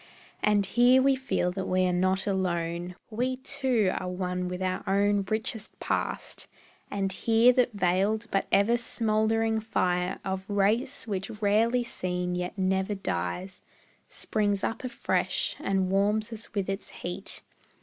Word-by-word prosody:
And 205 -1 +3
here 245 +6 +5
we 270 +1 +4
feel 260 -9 0
that 190 +1 -4
we 185 0 +2
are 180 - +1
not 185 +1 +1
alone, 175 -2 -1 0.2
We 250 +4 -1
too 260 -7 +1
are 185 - -4
one 180 0 -2
with 180 0 -4
our 185 -1 -1
own 200 +1 +3
richest 220 0 -2
past; - - -3 0.4
And 195 -1 -1
here 230 +5 +4
that 245 -2 +2
veiled, 200 +3 +1
but 195 - +1
ever 220 +4 +4
smouldering 225 -1 +1
fire 180 -4 0
Of 190 0 -3
race, 215 +7 +1
which 195 0 -3
rarely 225 +4 +3
seen 180 -5 -2
yet 180 +2 -3
never 190 +2 +1
dies, 190 -1 -3 0.5
Springs 205 -2 -1
up 225 - -2
afresh 245 -2 -1
and 190 -1 0
warms 210 +3 +1
us 220 -1 -8
with 200 -2 0
its 195 +1 -4
heat. 180 +3 -6
200 Hz, 145 wpm, -28 LUFS, 185-225 Hz, 0.5 s, here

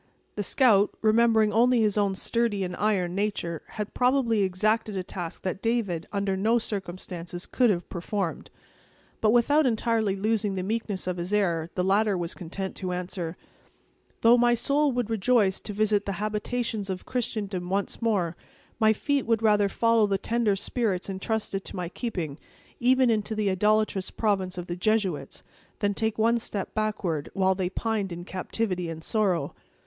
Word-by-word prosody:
The 210 - -3
scout, 210 -2 +4
remembering 220 -1 +4
only 240 +2 +4
his 210 -2 +2
own 200 -2 +1
sturdy 230 -1 0
and 180 -1 -4
iron 190 -4 +1
nature, 190 -5 -2
had 210 -1 -6
probably 250 -4 +2
exacted 210 +2 0
a 185 - -2
task 175 -2 -6
that 190 +1 -3
David, 220 -8 -1
under 200 -1 0
no 220 +5 +2
circumstances, 180 -4 -5
could 250 -2 +2
have 180 -4 0
performed. 180 0 -3 0.7
But, 215 - +4
without 265 +6 +4
entirely 225 -3 +1
losing 210 0 0
the 185 - -2
meekness 210 -2 -2
of 180 -1 -2
his 175 +2 -4
air, 170 -6 +1
the 180 - +1
latter 200 +1 +2
was 170 0 -3
content 190 +2 -5
to 185 -2 -3
answer: 180 -1 -4 0.8
"Though 235 +1 +6
my 240 0 +4
soul 285 +4 +2
would 240 -3 -2
rejoice 215 -2 +2
to - - -6
visit 210 0 +1
the 200 - -1
habitations 215 +1 -2
of 185 -1 -4
Christendom 205 -7 -3
once 200 +4 -2
more, 190 -8 +1 0.4
my 220 0 +5
feet 280 +3 -1
would 225 -1 +1
rather 210 -2 +4
follow 230 0 +3
the 195 -1 +1
tender 225 0 +1
spirits 200 -2 -1
intrusted 195 0 -2
to - - -7
my 180 -2 -3
keeping, 175 - -4 0.4
even 255 0 +4
into 220 0 -1
the 210 -2 +1
idolatrous 210 0 +1
province 190 -4 -1
of 175 - -4
the 175 - -4
Jesuits, 180 -7 -1 0.3
than 205 0 0
take 220 +1 -1
one 230 +2 +3
step 205 -3 -4
backward, 200 -8 -2
while 190 -1 +3
they 185 -1 -2
pined 210 -1 -2
in 175 +1 -6
captivity 185 -1 -2
and 160 -1 -7
sorrow." 195 -5 0
205 Hz, 165 wpm, -27 LUFS, 185-225 Hz, 0.8 s, Though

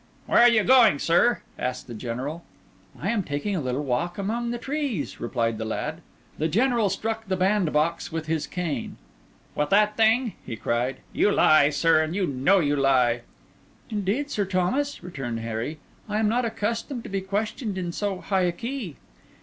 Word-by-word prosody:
"Where - - +3
are 240 - +8
you 220 -3 +3
going, 240 - +6
sir?" 175 +11 +2 0.2
asked 125 0 -3
the 120 - -9
General. 130 +8 -5 0.6
"I 185 - -2
am 230 -3 +1
taking 175 +5 -3
a 170 - -1
little 130 +2 -2
walk 140 +7 -1
among 230 +4 -2
the 240 - -2
trees," 250 - -3
replied 115 -2 -1
the - - -2
lad. 110 - -3 0.4
The 155 - +1
General 230 - +2
struck 225 +3 -3
the 190 -1 0
bandbox 170 -5 +1
with 160 -1 -3
his 160 -1 -1
cane. 160 -9 -4 0.6
"With 150 0 -1
that 210 +1 +3
thing?" 225 +1 +3
he 115 - -6
cried; 120 +4 -2
"you 205 - +3
lie, 155 -6 +5
sir, 155 +2 +3
and 155 +2 -2
you 195 -2 +1
know 140 +7 +3
you 145 -3 +1
lie!" 130 -4 +3 0.7
"Indeed, 215 +8 -1
Sir 210 - 0
Thomas," 190 +9 -1
returned 130 -10 -5
Harry, 115 +7 -4 0.3
"I 210 - -1
am 220 0 +2
not 240 +3 +1
accustomed 230 +3 -3
to - - -8
be 195 -1 -1
questioned 210 +2 -3
in 175 -2 -3
so 195 0 -3
high 190 -2 0
a 175 - +2
key." 230 - -5
185 Hz, 180 wpm, -25 LUFS, 145-220 Hz, 0.7 s, are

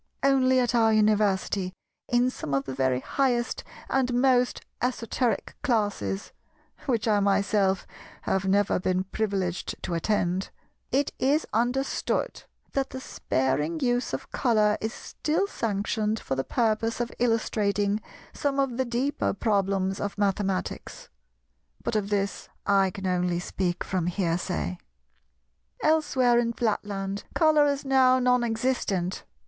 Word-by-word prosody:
Only 260 -1 +4
at 245 0 +1
our 225 -2 +4
University 205 -3 +2 0.4
in 245 +1 +3
some 145 - -3
of 135 - +1
the 135 - -5
very 130 -1 +1
highest 245 - 0 0.2
and 260 -2 +1
most 250 -1 +3 0.2
esoteric 245 -1 -1
classes—which 225 - -2
I 210 -2 +4
myself 200 -1 +2 0.4
have 190 0 0
never 200 0 +2
been 185 0 0
privileged 190 -3 -2
to 180 - -3
attend—it 190 - -2
is 290 +4 +2
understood 245 +5 -1 0.3
that 270 -1 -1
the 260 - -6
sparing 150 - -1
use 245 0 0
of - - -5
Colour 215 -4 +3
is 220 - -2
still 320 +9 -2
sanctioned 215 - -1
for - - -3
the 135 0 -1
purpose 225 - 0
of 240 0 -2
illustrating 210 -3 +1 0.3
some 280 -1 -1
of 265 -3 0
the 260 - +1
deeper 260 +5 0
problems 195 -2 0
of 205 0 -3
mathematics. 195 -2 -2 0.7
But - - -2
of 205 -2 0
this 200 -1 -2 0.2
I 195 -1 +4
can 195 0 -7
only 180 -1 +1
speak 175 0 -2
from 180 -3 -1
hearsay. 175 - -1 1.0
Elsewhere 275 -6 +3
in 235 -1 0
Flatland, 205 -3 -2
Colour 310 -3 +5
is 280 0 -1
now 260 -1 +5
non 250 -1 +3
existent. 225 -6 -1
215 Hz, 125 wpm, -27 LUFS, 190-250 Hz, 1.0 s, Colour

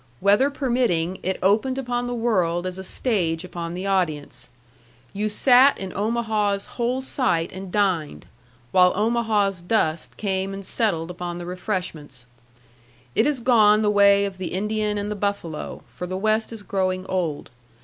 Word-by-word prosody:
Weather 205 +8 +4
permitting, 235 - 0
it 190 +1 -1
opened 220 +7 +2
upon 245 -2 -2
the 245 - -3
world 185 -7 0
as 185 0 -4
a - - -6
stage 180 -6 -1
upon 170 -1 -6
the 185 +2 -5
audience. 155 -10 -1 0.6
You 210 +2 -1
sat 255 +5 +5
in 190 -2 -6
Omaha's 210 -2 0
whole 245 +2 -2
sight 250 -11 0
and 190 0 -8
dined, 185 -7 0 0.5
while 180 -1 +5
Omaha's 210 -3 +1
dust 170 -4 -1
came 195 -1 -2
and 195 0 -8
settled 180 -8 -1
upon 175 -1 -5
the 175 - -6
refreshments. 175 - -4 0.9
It 220 - +3
is 285 -4 0
gone 220 -3 +5
the 210 - +3
way 200 -1 +5
of 195 -2 -6
the 185 - -4
Indian 210 +2 -1
and 205 +1 -3
the - - -2
buffalo, 200 -6 -4
for 180 - -7
the 185 +1 -3
West 215 +3 0
is 225 -3 -8
growing 185 -2 -1
old. 175 -6 -3
200 Hz, 160 wpm, -23 LUFS, 180-220 Hz, 0.9 s, sat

